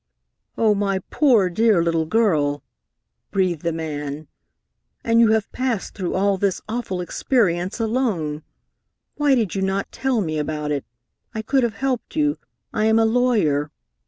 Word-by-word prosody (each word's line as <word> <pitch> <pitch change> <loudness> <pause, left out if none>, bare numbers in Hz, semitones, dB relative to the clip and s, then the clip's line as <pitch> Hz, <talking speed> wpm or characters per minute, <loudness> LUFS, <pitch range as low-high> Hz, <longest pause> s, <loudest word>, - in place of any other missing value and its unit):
"Oh, 220 -2 +4
my 200 -1 0
poor 240 -10 +4
dear 200 0 +3
little 165 -1 0
girl!" 155 -10 +1 0.7
breathed 185 -5 0
the 170 - -1
man. 150 -2 -5 0.8
"And 230 0 +3
you 230 - +6
have 220 -2 0
passed 250 -6 -2
through 185 -3 -3
all 195 +1 +2
this 195 -2 0
awful 215 -5 -3
experience 180 -1 0
alone! 215 - -1 0.8
Why 290 -2 +3
did 220 -8 0
you 195 - -2
not 195 +1 -1
tell 265 -3 0
me 155 -6 -1
about 150 0 -3
it? 140 -2 -2 0.5
I 220 - -3
could 265 +4 +2
have 235 -4 -1
helped 260 +2 -2
you. 295 -1 +1 0.3
I 215 - +1
am 220 0 +4
a 225 - +4
lawyer." 220 - +2
200 Hz, 155 wpm, -22 LUFS, 165-230 Hz, 0.8 s, you